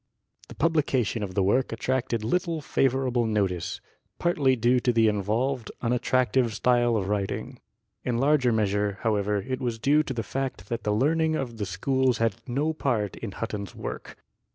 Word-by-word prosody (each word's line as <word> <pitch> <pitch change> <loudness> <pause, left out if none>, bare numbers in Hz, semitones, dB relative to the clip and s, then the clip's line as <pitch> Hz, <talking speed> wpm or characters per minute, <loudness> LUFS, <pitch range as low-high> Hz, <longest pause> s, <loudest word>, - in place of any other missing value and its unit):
The - - -11
publication 135 -9 +1
of 95 -3 -5
the 100 - +2
work 125 +7 +2
attracted 120 -1 -1
little 170 +6 0
favorable 130 -4 +1
notice, 100 -5 -1 0.4
partly 145 -7 +2
due 120 +2 +3
to 125 - +2
the 115 -1 +4
involved, 110 +4 0
unattractive 125 -1 +1
style 120 0 +3
of 95 -3 -2
writing; 100 -1 -3 0.4
in 120 -2 -1
larger 135 -1 +3
measure, 105 -2 0
however, 105 -2 0
it 130 0 -3
was 120 -3 -2
due 145 +6 +3
to 150 -3 -4
the 115 - -2
fact 135 +5 -4
that 115 0 -2
the 105 - +1
learning 155 +8 +2
of 120 -6 -4
the 105 -2 -3
schools 130 +5 +1
had 115 -3 0
no 145 +6 0
part 115 - -1
in 110 -4 -6
Hutton's 105 -3 -5
work. - - -7
120 Hz, 165 wpm, -26 LUFS, 105-130 Hz, 0.4 s, the